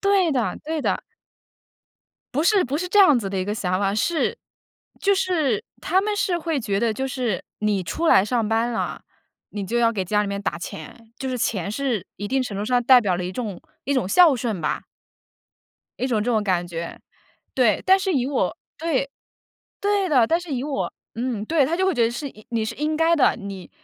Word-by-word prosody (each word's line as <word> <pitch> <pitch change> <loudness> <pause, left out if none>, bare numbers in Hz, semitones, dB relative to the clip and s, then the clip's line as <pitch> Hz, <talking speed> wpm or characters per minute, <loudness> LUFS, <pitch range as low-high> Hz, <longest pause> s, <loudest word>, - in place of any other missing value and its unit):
对 390 -5 +3
的， 245 -4 -1
对 315 -1 -2
的。 - - 0 1.3
不 295 - +2
是 390 +1 +4
不 265 +3 -2
是 360 +4 -3
这 415 - +2
样 300 -10 +7
子 200 -4 -3
的 195 - -2
一 185 - -1
个 205 +2 -2
想 185 -3 -1
法， 195 0 +1
是 320 +10 0 0.6
就 400 0 +3
是 315 - 0 0.2
他 370 +4 +2
们 415 +1 -1
是 360 -3 +1
会 325 -4 -1
觉 200 -4 -1
得， 230 -2 +2
就 265 +5 -3
是 250 -8 -2
你 210 -2 0
出 325 - -2
来 190 - +6
上 230 0 0
班 230 +2 +1
了， 230 - -3 0.5
你 205 -1 -4
就 235 +5 -1
要 230 -1 +3
给 195 -4 -2
家 210 +3 +1
里 205 - -3
面 200 0 -3
打 200 - -2
钱， 220 +7 -9
就 265 - -3
是 255 - -2
钱 200 -4 -1
是 235 -6 -2
一 205 - -5
定 265 +2 +1
程 205 -6 -5
度 205 - -2
上 245 +2 +2
代 255 +1 +7
表 190 -6 0
了 180 - -3
一 180 - -4
种 205 -4 -5 0.2
一 280 - 0
种 250 -8 0
孝 335 - +6
顺 225 -6 -2
吧！ 150 - -1 1.2
一 255 - 0
种 225 -5 +1
这 245 - 0
种 220 -3 +2
感 180 -3 0
觉， 170 -1 -6 0.6
对。 240 -5 +3
但 380 +1 +6
是 385 0 0
以 255 -4 +1
我 275 - -1 0.2
对， 285 -4 -1 0.7
对 405 -2 +1
的， 255 -6 +5
但 330 - +2
是 350 -4 -6
以 255 0 -2
我 285 -1 -2 0.2
嗯， 235 -2 -2
对， 310 -1 +3
她 320 +5 -1
就 380 - +2
会 380 - +2
觉 240 - +2
得 230 - +2
是 260 +5 -4 0.2
你 230 -2 -1
是 - - -4
应 305 +1 -1
该 325 +1 +4
的， 290 - +4
你 200 -3 -8
245 Hz, 235 characters per minute, -23 LUFS, 205-310 Hz, 1.3 s, 样